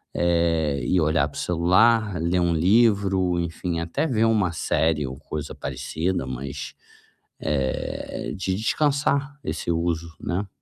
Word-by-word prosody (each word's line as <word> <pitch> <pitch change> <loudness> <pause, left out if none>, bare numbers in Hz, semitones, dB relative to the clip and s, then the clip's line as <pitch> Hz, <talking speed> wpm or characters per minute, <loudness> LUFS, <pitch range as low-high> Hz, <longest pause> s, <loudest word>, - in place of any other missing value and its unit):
eh, 85 -4 +1
e 90 -2 +2
olhar 75 -1 +2
para 75 - -13
o - - -3
celular, 90 +3 +3
ler 85 +2 +1
um 85 -1 +2
livro, 95 -1 +3
enfim, 85 0 -3
até 85 - -1
ver 115 -4 +2
uma 105 -6 +2
série 80 -2 +1
ou 65 0 -6
coisa 75 -1 -6
parecida, 80 +6 -2
mas, 65 +3 -6 0.7
eh, 70 -3 -2
de 95 0 -1
descansar 140 +4 0
esse - - -4
uso, 85 0 -1
né. 95 +3 -2
85 Hz, 135 wpm, -24 LUFS, 80-100 Hz, 0.7 s, celular